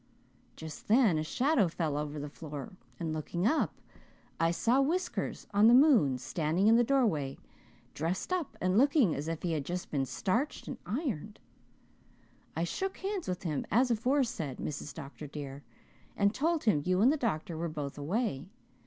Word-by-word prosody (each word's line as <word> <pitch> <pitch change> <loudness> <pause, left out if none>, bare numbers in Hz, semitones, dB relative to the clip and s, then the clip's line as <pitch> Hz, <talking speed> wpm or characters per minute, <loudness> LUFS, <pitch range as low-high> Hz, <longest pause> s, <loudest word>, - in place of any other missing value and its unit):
"Just 160 -1 -9
then 215 -8 +4
a - - -1
shadow 250 - +2
fell 160 -3 -2
over 150 0 -3
the 145 - -4
floor 145 -2 -8 0.3
and 160 -2 -2
looking 170 +4 -2
up 310 +8 +1 0.6
I 165 - +3
saw 235 +10 +2
Whiskers 345 +7 -1
on 205 +2 +6
the 235 - +8
moon, 250 - +5
standing 160 +7 0
in 225 - +7
the 240 - +5
doorway, 215 - +1 0.6
dressed 170 - -2
up 355 -5 -2
and 185 +3 +2
looking 275 - +4
as 145 +2 -4
if 165 -1 -4
he 175 - 0
had 155 -3 -1
just 180 +4 -5
been 135 -3 0
starched 230 - -1
and 265 - -6
ironed. 215 - -3 1.2
I 165 - 0
shook 380 - -3
hands 390 -1 -3
with 180 0 -3
him, 155 -5 -1
as 245 +5 +3
aforesaid, 230 - 0
Mrs. 150 -1 -5
Dr. 150 0 -9
dear, 140 -1 -7 0.6
and 200 0 +3
told 320 +4 0
him 185 -10 +3
you 185 +2 +1
and 250 +5 +6
the - - +2
doctor 185 - -2
were 165 +1 -2
both 145 -3 -5
away. 170 - -2
180 Hz, 170 wpm, -31 LUFS, 155-250 Hz, 1.2 s, the